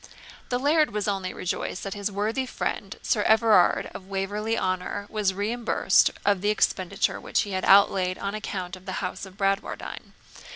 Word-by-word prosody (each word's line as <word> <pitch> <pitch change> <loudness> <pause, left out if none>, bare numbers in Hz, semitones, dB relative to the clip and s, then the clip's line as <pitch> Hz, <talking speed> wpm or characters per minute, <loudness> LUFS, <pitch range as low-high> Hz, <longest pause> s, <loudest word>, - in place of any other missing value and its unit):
The 245 - +1
laird 300 +4 +3
was 210 0 -3
only 195 -2 -1
rejoiced 180 +1 -4
that 195 - -4
his 205 0 -3
worthy 220 +6 -1
friend, - - -4
Sir - - +1
Everard 220 -5 +4
Waverley - - -11
of 190 - -9
Waverley 205 +3 -2
Honour, 185 +2 -2
was 205 -3 0
reimbursed 225 +4 +2 0.2
of 200 -2 +2
the 205 - +1
expenditure 195 -2 0
which - - +1
he 205 -3 -4
had 185 -1 -1
outlaid 190 -2 +5
on 200 0 -4
account 190 -4 -4
of 185 0 -16
the 190 - -3
house 185 - -5
of 190 0 -16
Bradwardine. 195 0 -2
200 Hz, 175 wpm, -26 LUFS, 190-215 Hz, 0.2 s, outlaid